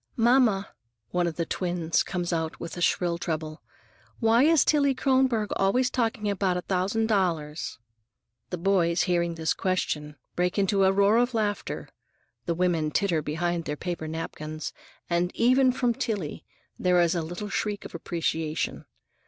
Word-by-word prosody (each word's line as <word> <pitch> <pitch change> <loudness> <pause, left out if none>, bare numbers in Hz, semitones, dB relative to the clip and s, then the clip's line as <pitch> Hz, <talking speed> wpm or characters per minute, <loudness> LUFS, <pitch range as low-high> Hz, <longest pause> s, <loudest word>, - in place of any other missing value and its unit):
"Mamma," 235 -4 +3 0.4
one 175 -1 +1
of 165 - -3
the 170 - -1
twins 175 -2 0
comes 175 -1 -2
out 160 -1 -1
in 170 - -5
a 175 - -6
shrill 170 0 +1
treble, 155 -2 -4 0.6
"why 225 +1 +4
is 315 +1 +5
Tillie 280 -3 +3
Kronborg 260 -5 +2
always 245 +7 +2
talking 225 -3 -1
about 190 -2 +1
a 180 - -4
thousand 195 +5 0
dollars?" 170 -8 -1 0.7
The 180 - -3
boys, 175 -1 +2
hearing 170 -2 0
this 160 -1 0
question, 150 -5 -2 0.2
break 180 +2 0
into 195 0 +3
a 190 - +5
roar 200 +3 +4
of 245 0 +1
laughter, 210 -2 -2 0.6
the 170 - 0
women 170 -3 +1
titter 170 0 +1
behind 165 +3 -2
their 150 - -3
paper 170 -2 -4
napkins, 155 -1 -5 0.3
and 175 +1 +1
even 255 +2 +4
from 245 -1 +1
Tillie 205 -9 -3 0.3
there 180 -1 +3
is 170 0 +3
a 170 - 0
little 175 +6 -5
shriek 205 0 -2
of - - -9
appreciation. 160 -2 -2
180 Hz, 155 wpm, -27 LUFS, 165-215 Hz, 0.7 s, is